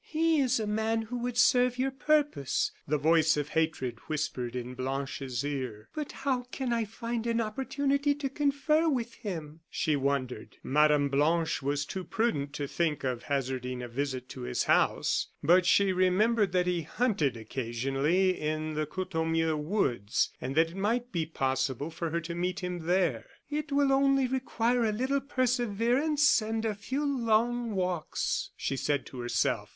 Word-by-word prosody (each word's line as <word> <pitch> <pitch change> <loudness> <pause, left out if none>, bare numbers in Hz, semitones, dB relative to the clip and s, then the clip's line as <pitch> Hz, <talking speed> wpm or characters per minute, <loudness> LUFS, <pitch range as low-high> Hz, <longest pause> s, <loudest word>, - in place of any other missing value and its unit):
"He 320 0 +1
is 260 -3 +2
a 220 - -1
man 220 +2 0
who 240 +3 -5
would 245 0 -3
serve 245 0 +4
your 265 +1 0
purpose," 290 - +1 0.2
the 150 - +1
voice 160 +1 +3
of 150 0 -2
hatred 155 -8 -1
whispered 130 -5 -3
in 125 0 -4
Blanche's 135 0 -3
ear. 130 -7 -4
"But 300 -2 -4
how 270 -2 -1
can 255 -2 -2
I 230 -1 0
find 230 +2 -4
an 230 0 +1
opportunity 275 +5 0
to 290 -1 -3
confer 295 +3 +1
with 235 -5 -1
him?" 165 -9 -6
she 155 - 0
wondered. 135 -4 -2
Mme. 150 +1 +4
Blanche 160 +4 +1
was 140 +1 -1
too 190 - -5
prudent 155 -11 -1
to 145 -1 -3
think 150 -2 -1
of 125 -3 -1
hazarding 130 -2 -2
a - - -5
visit 130 0 -3
to - - -8
his 60 0 -1
house, - - +2 0.2
but 175 +4 +5
she 200 -1 +4
remembered 195 +3 +3
that 180 0 +2
he 180 -1 0
hunted 160 - 0
occasionally 135 - 0
in 155 +1 -2
the 155 0 -1
Courtornieu 165 -2 -1
woods, 150 - 0
and 130 +2 -4
that 165 +1 +3
it - - -11
might 235 +5 -1
be 165 -4 -1
possible 135 0 -1
for 165 +1 -3
her 170 +2 -1
to 170 +1 -5
meet 180 +2 -2
him 180 -2 -4
there. 170 -11 +1 0.2
"It 300 +1 -3
will 280 -1 +3
only 275 0 +3
require 245 -2 0
a 220 - +2
little 260 +6 0
perseverance 255 +3 +2
and 220 +1 -2
a 220 - 0
few 260 +8 -3
long 235 -3 +1
walks," 180 -4 -1
she 135 - -2
said 140 +1 -1
to 130 - -9
herself. 120 -3 0
180 Hz, 165 wpm, -29 LUFS, -, 0.2 s, but